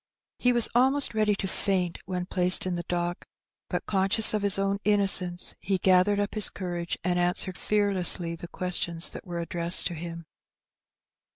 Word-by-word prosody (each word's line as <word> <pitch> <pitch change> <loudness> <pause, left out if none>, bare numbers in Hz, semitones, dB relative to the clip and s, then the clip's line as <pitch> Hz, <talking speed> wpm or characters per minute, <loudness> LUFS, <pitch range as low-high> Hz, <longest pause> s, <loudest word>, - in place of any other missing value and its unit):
He 250 - +1
was 240 -2 +2
almost 265 +3 +1
ready 215 -1 0
to 195 - -6
faint 185 -3 -3
when 180 -1 -5
placed 180 0 +1
in 185 - -4
the 175 - -4
dock; 175 0 -4 0.5
but^ - - -5
conscious 195 +3 +5
of 210 - -2
his 200 -1 +4
own 195 0 -2
innocence^ 195 -4 +2
he 195 0 -3
gathered 185 +2 +1
up 205 0 -4
his 215 -2 +3
courage^ 175 -2 -6
and 180 0 -2
answered 180 +1 -2
fearlessly 185 -5 -1
the 170 - -11
questioBB 175 -2 +1
that - - -12
were 175 -1 -6
addressed 170 +1 +2
to 175 - -4
him. 170 0 -9
185 Hz, 170 wpm, -25 LUFS, 175-205 Hz, 0.5 s, conscious